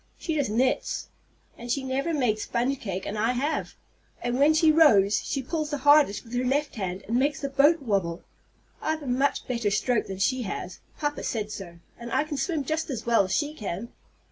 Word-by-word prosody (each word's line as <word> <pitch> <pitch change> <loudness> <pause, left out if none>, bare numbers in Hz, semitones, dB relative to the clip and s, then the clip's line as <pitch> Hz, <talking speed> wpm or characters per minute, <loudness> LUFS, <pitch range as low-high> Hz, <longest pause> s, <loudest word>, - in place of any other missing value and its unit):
She 325 - -3
just 285 -7 0
knits. 250 +5 0 0.5
And 240 +1 -5
she 275 +2 0
never 270 +5 -1
made 245 -9 +1
sponge 250 +5 -1
cake, 190 -3 -4
and 210 +1 -4
I 225 +3 +2
have; 285 +5 -2 0.5
and 240 +1 -1
when 300 +3 +5
she 315 0 +5
rows, 215 -11 +5
she 275 - -2
pulls 310 +2 -2
the 295 - -2
hardest 290 -6 +4
with 230 0 -13
her 245 +1 0
left 280 +3 0
hand, 190 -3 -4
and 235 +3 +1
makes 285 +1 +1
the 280 - -2
boat 285 +3 +4
wabble. 190 -7 -1 0.6
I've 315 -1 -2
a - - -7
much 265 +3 0
better 235 -4 0
stroke 225 +3 +1
than 190 - -5
she 255 +7 +1
has. 185 -4 -5 0.2
Papa 295 -1 -2
said 215 -3 -3
so. 175 -5 -8 0.2
And 235 0 -7
I - - +2
can 305 -2 -5
swim 320 -2 -1
just 315 +4 -2
as 260 -5 -4
well 230 -4 +4
as 185 - -6
she 295 0 -1
can! 210 - -5
255 Hz, 210 wpm, -26 LUFS, 215-290 Hz, 0.6 s, when